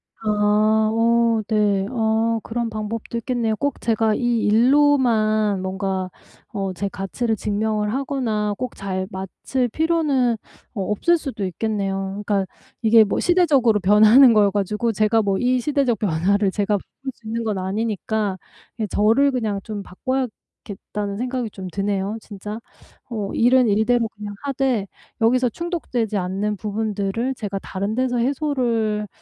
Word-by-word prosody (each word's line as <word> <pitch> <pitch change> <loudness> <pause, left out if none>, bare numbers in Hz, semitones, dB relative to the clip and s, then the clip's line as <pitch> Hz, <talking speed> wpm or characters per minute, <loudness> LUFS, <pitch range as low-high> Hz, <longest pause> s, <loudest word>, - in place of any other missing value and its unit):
아. 215 0 +2
어 230 0 +2
네. 205 -3 +2
어 225 -1 +1
그런 235 +1 -3
방법도 215 +1 -5
있겠네요. 230 -2 -1
꼭 285 +4 -2
제가 220 -1 +1
이 240 -1 +1
일로만 225 -4 +3
뭔가 190 0 -2 0.4
어 195 -3 -2
제 200 +3 -3
가치를 220 +5 -2
증명을 210 +1 -1
하거나 245 -6 -1
꼭 255 - -5
잘 190 -1 -3
맞출 195 +7 -3
필요는 300 -5 +1 0.4
어 210 - -3
없을 345 - +2
수도 270 -10 -4
있겠네요. 195 0 -2
그러니까 200 -2 +1 0.4
이게 225 -1 +6
뭐 205 - -1
시대적으로 285 -12 +3
변하는 215 +6 +7
거여 210 -2 +5
가지고 210 +3 -1
제가 215 +1 +2
뭐 200 -2 0
이 255 +1 +2
시대적 265 -4 0
변화를 195 +2 +1
제가 205 +1 0
바꿀 265 +7 -9
수 225 - -15
있는 230 +1 -2
건 215 -3 -1
아니니까 210 0 -2 0.4
예 215 - -1
저를 225 +8 +3
그냥 220 -6 -1
좀 210 -2 -6
바꿔야겠다는 210 -3 -5
생각이 250 0 -2
좀 190 -2 -8
드네요, 200 +2 -2
진짜. 210 +1 -7 0.5
어 210 -4 -3
'일은 250 +1 +4
일대로 225 +3 +2
그냥 205 -1 -8
하되 265 -7 0 0.3
여기서 250 +2 +3
충족되지 250 - -3
않는 195 +3 -1
부분들을 215 +3 -2
제가 205 -4 -4
다른 200 +3 -4
데서 255 0 0
해소를 235 -5 0
220 Hz, 295 characters per minute, -22 LUFS, 205-245 Hz, 0.5 s, 변하는